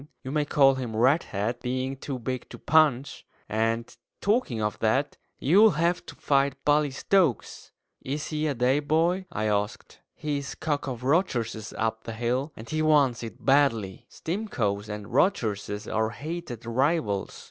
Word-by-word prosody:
You 130 - -5
may 150 0 +1
call 135 -2 +5
him 125 -4 -4
Redhead, 120 - +1
being 130 +2 -2
too 135 0 -5
big 125 +1 -5
to - - -9
punch; 145 -4 +2 0.2
and, 115 +3 -1 0.2
talking 205 - +1
of 105 -1 -2
that, 130 +6 +1 0.2
you'll 190 +3 +5
have 170 +2 +1
to - - -9
fight 140 -1 +1
Bully 150 0 +3
Stokes." 150 - 0 0.3
"Is 145 +3 -4
he 155 0 -1
a 145 - -1
day 125 +4 +2
boy?" 165 +5 +1
I 110 - -2
asked. 105 -1 -2 0.2
"He's 140 -2 -3
cock 145 -3 -2
of 125 -2 -5
Rogerses 120 - 0
up 110 0 -2
the 115 - -5
hill, 125 +6 -1
and 110 - -10
he 155 +4 -1
wants 145 -6 +3
it 115 -1 -9
badly. 125 -9 +2
Stimcoes 115 - -3
and 105 -1 -5
Rogerses 105 - 0
are 110 0 0
hated 140 -3 -6
rivals. 120 - 0
130 Hz, 155 wpm, -27 LUFS, 115-150 Hz, 0.3 s, call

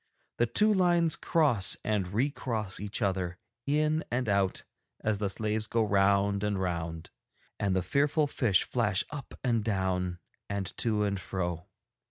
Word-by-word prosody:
The 120 - +4
two 210 - +3
lines 175 -4 +3
cross 140 - +2
and 105 -4 0
re 115 +10 0
cross 110 -9 -3
each 105 +3 -4
other 95 -2 -1 0.3
in 155 +2 +2
and 125 0 -1
out 100 -2 +1 0.4
as 110 -2 0
the 105 -2 0
slaves 110 +2 -1
go 115 -1 +1
round 100 0 +2
and 105 -2 0
round, 85 -3 -3 0.5
and 100 -2 +1
the 95 - +1
fearful 145 - +2
fish 120 -9 +2
flash 105 -6 +1
up 145 -2 -7
and 115 -4 +1
down 95 -4 -1 0.3
and 100 -2 -3
to 110 -3 +1
and 100 -2 0
fro.' 90 -2 -3
105 Hz, 155 wpm, -30 LUFS, 95-120 Hz, 0.5 s, The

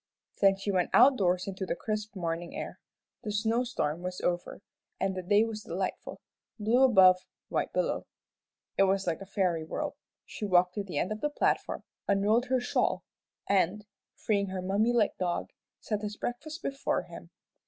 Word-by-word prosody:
Then 195 -1 +5
she 200 +1 -2
went 180 -2 +1
outdoors 185 -9 +5
into 195 0 -5
the 185 - -1
crisp 215 +1 -4
morning 170 -1 -3
air. - - -6 0.4
The 215 -4 -4
snow 225 +3 +1
storm 175 -10 -2
was 180 0 -4
over, 175 +2 -2 0.4
and 195 0 0
the 185 - -4
day 205 +4 +4
was 225 -2 -4
delightful 190 0 -4 0.4
blue 225 +4 +2
above, 190 -8 +7 0.3
white - - -1
below. - - -1 0.7
It 195 - +7
was 195 0 +1
like 170 +1 -1
a 195 - -8
fairy 180 -5 0
world. 155 - -3 0.3
She - - -8
walked 180 -2 +4
to 205 - -2
the 180 -7 -6
end 180 - 0
of 215 0 -4
the 295 - +1
platform, 295 - 0 0.2
unrolled 210 +5 +3
her 260 0 +2
shawl, 245 - 0 0.4
and, 200 +1 +2 0.3
freeing 200 -2 0
her 185 -1 -4
mummy 205 +5 +2
like 230 -4 +1
dog, 175 -1 -1 0.3
set 210 -2 -3
his 210 -1 -5
breakfast 310 +7 -5
before 275 0 -1
him. - - -11
200 Hz, 175 wpm, -30 LUFS, 185-220 Hz, 0.7 s, above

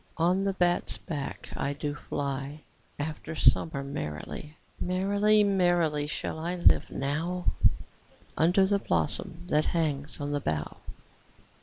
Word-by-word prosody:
On 180 +4 +2
the 195 - +1
bat's 175 -2 +1
back 145 -4 -5
I 140 +1 -1
do 145 0 -3
fly 140 +1 -4 0.4
After 155 +1 -5
summer 140 +1 +3
merrily: 140 - -6 0.2
5 - - -3
Merrily, 205 +3 +3
merrily, 175 -7 +2
shall 160 - -3
I 170 +3 -2
live 175 - +4
now, 165 +6 -2 0.9
Under 180 +5 +4
the 200 +1 +2
blossom 90 - -1
that 155 -3 +2
hangs 150 -3 -1
on 145 0 -3
the 145 0 -1
bough. 75 - -2
155 Hz, 130 wpm, -29 LUFS, 145-180 Hz, 0.9 s, live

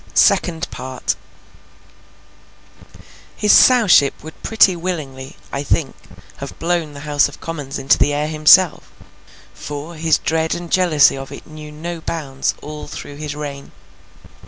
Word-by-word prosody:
SECOND 170 -1 +3
PART 130 0 -4 2.2
His 210 - +2
Sowship 210 - +5
would 160 0 -11
pretty 210 -4 +4
willingly, 150 -6 -5 0.2
I 140 - -3
think, 145 0 -1 0.4
have - - -8
blown 165 -3 -1
the 140 - -9
House 145 -1 +2
of 145 - -14
Commons 145 -5 -6
into 135 -1 +2
the - - +3
air 145 +1 -1
himself; 155 +4 +4 0.6
for, 150 +3 -7
his 160 -1 +1
dread 160 0 -1
and 175 -1 -8
jealousy 170 -8 +4
of 135 0 -8
it - - -10
knew 155 -1 -11
no 165 +2 -6
bounds 140 -5 -3
all 150 0 -8
through 145 - -9
his 150 -1 -5
reign. 140 -2 -7
155 Hz, 135 wpm, -19 LUFS, 145-165 Hz, 2.2 s, Sowship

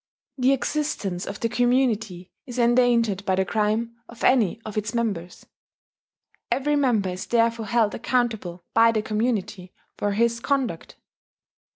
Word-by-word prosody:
The 255 +1 +4
existence 270 -10 -2
of 200 - -6
the 230 - +1
community 225 -6 0 0.2
is 245 -1 -7
endangered 235 -4 +3
by 190 -2 +1
the 190 0 +1
crime 220 +3 -1
of 235 - -11
any 230 -5 +3
of 215 - -7
its 215 +2 -2
members: 200 -7 -3 1.0
every 295 +2 +1
member 240 -9 +2
is 180 +1 -6
therefore 230 -1 +1
held 230 -3 +2
accountable 220 -8 -2
by 230 0 +5
the 215 -2 -1
community 210 -4 -2 0.2
for 205 0 0
his 235 +2 +1
conduct. 255 - -2
225 Hz, 140 wpm, -24 LUFS, 200-240 Hz, 1.0 s, by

